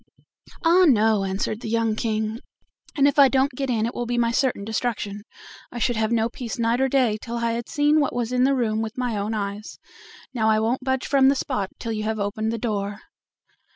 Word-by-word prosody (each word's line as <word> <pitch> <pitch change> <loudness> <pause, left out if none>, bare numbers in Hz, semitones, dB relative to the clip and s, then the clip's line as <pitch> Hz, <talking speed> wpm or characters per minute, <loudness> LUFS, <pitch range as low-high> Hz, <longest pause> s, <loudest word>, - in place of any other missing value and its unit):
"Ah! 355 +3 +6
no," 220 -5 +3
answered 195 +3 -3
the 230 - -5
young 225 -1 +1
King; 220 0 -2 0.6
"if 285 0 +3
I 275 - +9
don't 270 +2 +2
get 270 +1 -4
in, 225 -3 +1
it 235 - -3
will 240 - -4
be 240 0 -1
my 235 -1 +2
certain 245 -5 0
destruction; 215 -2 -3 0.5
I 245 - -7
should 240 +1 0
have 220 0 0
no 225 -1 +2
peace 235 -1 -6
night 235 +2 +1
or 265 - +2
day 245 -6 +2
till 235 0 -6
I 235 0 0
had 235 0 -4
seen 295 0 +3
what 285 - 0
was 240 -1 -2
in 250 0 +2
the 275 +1 +3
room 220 -3 0
with 220 +1 -5
my 250 -3 -1
own 210 +2 -2
eyes. 205 0 -5 0.6
Now 220 -3 +1
I 220 - +4
don't 230 +4 0
budge 260 0 -1
from 270 -1 +4
the 280 - +3
spot 200 -7 -2
till 230 - -5
you 215 -1 -2
have 220 0 -2
opened 215 +2 -2
the 230 - -2
door." 205 -3 -3
230 Hz, 220 wpm, -23 LUFS, 215-255 Hz, 0.6 s, I